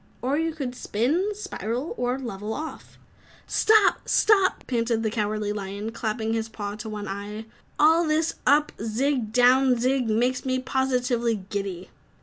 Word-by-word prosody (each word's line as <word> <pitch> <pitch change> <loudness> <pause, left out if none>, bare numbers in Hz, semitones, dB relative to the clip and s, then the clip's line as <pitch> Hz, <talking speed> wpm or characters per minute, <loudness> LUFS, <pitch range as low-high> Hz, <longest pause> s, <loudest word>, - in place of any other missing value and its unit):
"Or 265 +3 +1
you 325 +2 0
could 265 -6 -4
'spin,' 270 - 0
'spiral' 255 - -4
or 245 +1 -1
'level 220 -4 -5
off' 315 +1 -8 0.2
" - - -27
"Stop! 435 -2 +3
Stop!" 395 -3 +3
panted 230 -2 0
the 220 - 0
Cowardly 210 -1 -1
Lion, 200 +2 -5
clapping 225 -1 -2
his 225 0 -2
paw 205 -2 -5
to 215 +1 -6
one 210 -1 -5
eye, 205 +2 -6 0.3
"all 320 +2 +5
this 315 +1 +1
up 295 +2 +4
zig 245 +6 +1
and 230 -6 -3
down 250 +1 +4
zig 255 -1 +1
makes 245 +4 +1
me 260 -1 0
positively 250 -5 0
giddy!" 195 -3 -4
240 Hz, 155 wpm, -25 LUFS, 215-270 Hz, 0.3 s, all